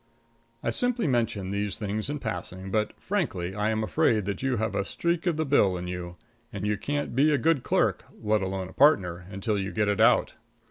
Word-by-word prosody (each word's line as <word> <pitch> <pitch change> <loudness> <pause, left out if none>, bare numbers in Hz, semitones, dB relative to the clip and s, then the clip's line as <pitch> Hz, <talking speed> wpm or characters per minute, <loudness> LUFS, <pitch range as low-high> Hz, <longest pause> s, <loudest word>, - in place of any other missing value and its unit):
I - - 0
simply 245 -3 +1
mention 115 - 0
these 100 0 -2
things 105 +3 -3
in 145 - -2
passing, 95 -4 -5
but, 110 0 -1
frankly, 100 - -2
I 105 +1 0
am 110 0 0
afraid 105 +1 +2
that 100 -1 -3
you 130 -2 0
have 110 -2 -1
a 100 - +1
streak 170 - -1
of 170 -3 +1
the 160 - 0
Bill 100 -10 +3
in 90 - -5
you; 90 -1 -5 0.4
and 100 0 -4
you 105 0 +1
can't 145 +4 -3
be 145 +4 +4
a 145 - +3
good 155 +2 +2
clerk, - - +1
let 105 0 +1
alone 95 -1 -3
a 95 - -13
partner, 90 - +3
until 100 +2 -2
you 95 0 -3
get 105 -1 0
it 105 +1 +1
out. 115 - +4
105 Hz, 215 wpm, -27 LUFS, 95-135 Hz, 0.4 s, be